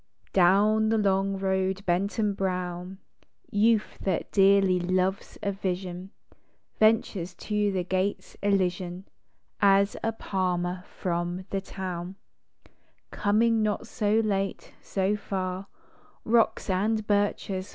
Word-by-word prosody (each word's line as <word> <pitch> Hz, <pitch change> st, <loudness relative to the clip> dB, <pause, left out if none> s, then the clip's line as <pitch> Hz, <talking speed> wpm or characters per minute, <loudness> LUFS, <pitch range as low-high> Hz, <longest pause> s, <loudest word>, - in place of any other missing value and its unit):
DOWN 205 Hz, +4 st, +4 dB
the 225 Hz, -, +2 dB
long 195 Hz, -1 st, +1 dB
road 190 Hz, 0 st, -1 dB
bent 185 Hz, +4 st, 0 dB
and 210 Hz, -3 st, +1 dB
brown, 180 Hz, -1 st, -3 dB, 0.5 s
Youth, 215 Hz, +1 st, +2 dB
that 190 Hz, -3 st, -2 dB
dearly 195 Hz, -2 st, +4 dB
loves 185 Hz, +2 st, -1 dB
a 200 Hz, -, 0 dB
vision, 185 Hz, -1 st, -4 dB, 0.7 s
Ventures 210 Hz, -5 st, +2 dB
to 210 Hz, -1 st, -1 dB
the 185 Hz, -2 st, -1 dB
gates 185 Hz, +2 st, -2 dB
Elysian, 185 Hz, -2 st, 0 dB, 0.6 s
As 200 Hz, 0 st, +4 dB
a 225 Hz, -, 0 dB
palmer 180 Hz, -4 st, -2 dB
from 175 Hz, +1 st, -2 dB
the 195 Hz, -, -1 dB
town, 185 Hz, -1 st, -6 dB, 1.0 s
Coming 225 Hz, +2 st, +2 dB
not 215 Hz, +1 st, -1 dB
so 210 Hz, -2 st, 0 dB
late, 195 Hz, -2 st, -2 dB
so 195 Hz, +1 st, 0 dB
far, 190 Hz, -1 st, -4 dB, 0.6 s
Rocks 230 Hz, 0 st, +2 dB
and 210 Hz, +3 st, 0 dB
birches! 205 Hz, -2 st, 0 dB
195 Hz, 110 wpm, -27 LUFS, 185-205 Hz, 1.0 s, DOWN